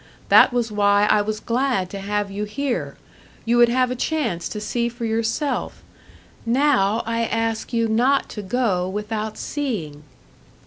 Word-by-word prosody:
That -, -, +7 dB
was 240 Hz, -2 st, -1 dB
why 205 Hz, 0 st, +3 dB
I 210 Hz, -, +4 dB
was 215 Hz, +1 st, -3 dB
glad 235 Hz, -7 st, -1 dB
to 200 Hz, -, -5 dB
have 205 Hz, 0 st, -2 dB
you 205 Hz, +2 st, -3 dB
here 250 Hz, +4 st, -3 dB, 0.5 s
you 235 Hz, +1 st, +2 dB
would 240 Hz, 0 st, +6 dB
have 255 Hz, +1 st, +1 dB
a -, -, -2 dB
chance 245 Hz, -, -2 dB
to 210 Hz, -, -5 dB
see 235 Hz, +3 st, -1 dB
for 235 Hz, 0 st, -6 dB
yourself. 230 Hz, +6 st, -2 dB, 0.6 s
Now 235 Hz, -4 st, +2 dB
I 230 Hz, +1 st, -1 dB
ask 225 Hz, -1 st, -2 dB
you 230 Hz, -1 st, +1 dB
not 250 Hz, +5 st, +2 dB
to 210 Hz, -, -6 dB
go 190 Hz, -4 st, 0 dB
without 210 Hz, +2 st, -4 dB
seeing." 200 Hz, -, -4 dB
225 Hz, 155 wpm, -22 LUFS, 205-245 Hz, 0.6 s, That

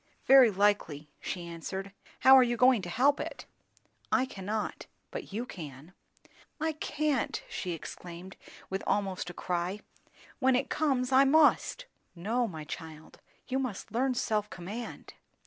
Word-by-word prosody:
"Very 265 Hz, -3 st, +8 dB
likely," 190 Hz, -7 st, +1 dB
she 175 Hz, -2 st, -5 dB
answered. 190 Hz, +4 st, -6 dB, 0.3 s
"How 265 Hz, +1 st, +9 dB
are 265 Hz, -, +9 dB
you 240 Hz, -1 st, +1 dB
going 250 Hz, -2 st, +5 dB
to 175 Hz, -, -6 dB
help 275 Hz, -, +3 dB
it?" -, -, -6 dB, 0.7 s
"I 260 Hz, -, +3 dB
cannot; 210 Hz, -2 st, -4 dB, 0.2 s
but -, -, -6 dB
you 225 Hz, +5 st, -3 dB
can." 155 Hz, -, -10 dB, 0.7 s
"I 320 Hz, +1 st, 0 dB
can't!" 300 Hz, -3 st, -1 dB
she 180 Hz, -2 st, -4 dB
exclaimed, 175 Hz, +3 st, -9 dB, 0.3 s
with 190 Hz, +1 st, -3 dB
almost 195 Hz, -3 st, -1 dB
a -, -, -7 dB
cry. 180 Hz, +3 st, -2 dB, 0.6 s
"When 260 Hz, 0 st, +4 dB
it 255 Hz, -, -1 dB
comes, 270 Hz, -4 st, +1 dB
I 265 Hz, +1 st, +7 dB
must." 315 Hz, -, +4 dB, 0.3 s
"No, 225 Hz, +8 st, 0 dB
my 160 Hz, -6 st, -7 dB
child; 160 Hz, 0 st, -9 dB, 0.3 s
you 260 Hz, +1 st, 0 dB
must 250 Hz, -7 st, -4 dB
learn 255 Hz, +2 st, +1 dB
self 215 Hz, -4 st, 0 dB
command." 205 Hz, +7 st, -7 dB
210 Hz, 145 wpm, -30 LUFS, 180-260 Hz, 0.7 s, How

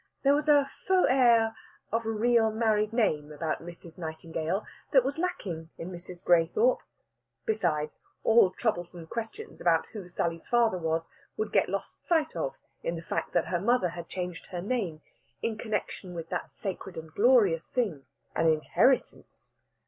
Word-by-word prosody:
There 280 Hz, 0 st, +5 dB
was 300 Hz, +1 st, +1 dB
a 285 Hz, -2 st, +5 dB, 0.2 s
faux 375 Hz, -1 st, +5 dB
air 235 Hz, -4 st, +5 dB, 0.4 s
of 230 Hz, 0 st, 0 dB
a -, -, +1 dB
real 225 Hz, +1 st, +3 dB
married 215 Hz, -1 st, +1 dB
name 155 Hz, -11 st, +1 dB
about 155 Hz, +1 st, -2 dB
Mrs. 170 Hz, 0 st, -11 dB
Nightingale 165 Hz, +3 st, -3 dB, 0.3 s
that 265 Hz, -3 st, +6 dB
was 275 Hz, +4 st, -2 dB
lacking 175 Hz, -, -3 dB
in 175 Hz, +3 st, -6 dB
Mrs. 175 Hz, 0 st, -9 dB
Graythorpe. 180 Hz, -, +4 dB, 0.6 s
Besides, 165 Hz, -8 st, 0 dB, 0.2 s
all 225 Hz, -4 st, +6 dB
troublesome 175 Hz, -4 st, -2 dB
questions 235 Hz, -, -6 dB
about 165 Hz, -2 st, +3 dB
who 200 Hz, -5 st, -7 dB
Sally's 165 Hz, -1 st, -2 dB
father 230 Hz, -6 st, +3 dB
was 165 Hz, 0 st, -1 dB, 0.3 s
would 435 Hz, -, -2 dB
get -, -, +3 dB
lost -, -, -4 dB
sight 325 Hz, -3 st, +1 dB
of -, -, -2 dB, 0.3 s
in 170 Hz, -, -2 dB
the 165 Hz, -, -6 dB
fact -, -, -3 dB
that -, -, +1 dB
her 175 Hz, -1 st, +1 dB
mother 235 Hz, -3 st, +3 dB
had 170 Hz, 0 st, -8 dB
changed 180 Hz, -2 st, -5 dB
her 180 Hz, -, -5 dB
name 185 Hz, -6 st, -2 dB, 0.4 s
in 230 Hz, -1 st, 0 dB
connexion 210 Hz, -4 st, -4 dB
with 165 Hz, -1 st, -6 dB
that -, -, -3 dB
sacred 190 Hz, -1 st, -5 dB
and 160 Hz, -1 st, -8 dB
glorious 205 Hz, -8 st, +4 dB
thing, 195 Hz, -, -1 dB, 0.3 s
an 165 Hz, -, +3 dB
inheritance. 160 Hz, -, +1 dB
190 Hz, 160 wpm, -29 LUFS, 165-235 Hz, 0.6 s, that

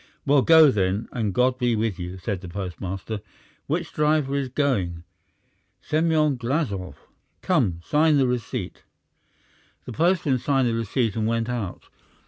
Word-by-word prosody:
"Well, 140 Hz, -1 st, +4 dB
go 160 Hz, 0 st, +7 dB
then, 100 Hz, +1 st, 0 dB
and 110 Hz, -4 st, -1 dB
God 125 Hz, +4 st, +1 dB
be 120 Hz, -2 st, +1 dB
with 110 Hz, -3 st, -1 dB
you," 90 Hz, +1 st, -6 dB
said 95 Hz, 0 st, -4 dB
the 90 Hz, -, -8 dB
postmaster. 95 Hz, +3 st, -5 dB, 0.5 s
"Which -, -, -2 dB
driver 150 Hz, -2 st, +1 dB
is 140 Hz, -2 st, -1 dB
going?" 100 Hz, -, -1 dB, 0.8 s
"Semyon 155 Hz, -, +1 dB
Glazov." 120 Hz, -, -2 dB, 0.5 s
"Come, 115 Hz, -, +1 dB
sign 150 Hz, 0 st, +3 dB
the 135 Hz, -, +3 dB
receipt." 125 Hz, -2 st, -4 dB, 1.0 s
The 125 Hz, -, -7 dB
postman 165 Hz, -3 st, +2 dB
signed 135 Hz, -1 st, +1 dB
the 115 Hz, -, 0 dB
receipt 115 Hz, 0 st, -1 dB
and 110 Hz, -1 st, 0 dB
went 115 Hz, +1 st, -1 dB
out. 115 Hz, -7 st, -4 dB
120 Hz, 140 wpm, -24 LUFS, 100-145 Hz, 1.0 s, go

